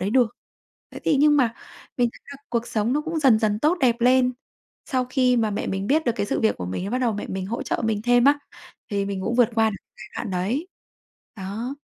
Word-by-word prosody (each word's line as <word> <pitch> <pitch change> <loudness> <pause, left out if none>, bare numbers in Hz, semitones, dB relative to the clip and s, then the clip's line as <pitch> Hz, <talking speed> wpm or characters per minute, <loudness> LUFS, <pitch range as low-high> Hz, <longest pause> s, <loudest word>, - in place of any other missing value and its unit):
đấy 195 - -1
được. 245 -2 +2 0.6
Thế - - -7
thì 295 - +3
nhưng 295 +1 +5
mà 240 -5 +2 0.4
mình 245 -1 +3
thấy - - -17
là 280 - -10
cuộc 235 -1 -1
sống 220 +2 0
nó 295 - +1
cũng 320 +1 -3
dần 265 -7 +5
dần 210 -2 0
tốt 310 +9 +2
đẹp 240 -2 +2
lên. 250 +1 +4 0.5
Sau 255 -2 0
khi 255 -1 +2
mà 220 -2 +1
mẹ 200 - -3
mình 195 +1 -2
biết 310 +2 +2
được 235 - +3
cái 205 - -1
sự - - -1
việc 220 - +2
của 90 - -5
mình 95 - -4
á 200 - -4
bắt 250 - +1
đầu 245 -3 +1
mẹ 205 - -4
mình 190 0 -4
hỗ 225 +5 -4
trợ - - -2
mình 215 -2 0
thêm 245 +1 +4
á, 290 +1 +5 0.5
thì 200 -1 0
mình 195 -1 -3
cũng 230 +4 -1
vượt 245 -2 +4
qua 225 -1 +4
được 200 - -5 0.2
giai 215 - -10
đoạn 200 - -4
đấy. 210 - -1 0.7
Đó. 215 +7 -5
235 Hz, 250 wpm, -24 LUFS, 205-260 Hz, 0.7 s, nhưng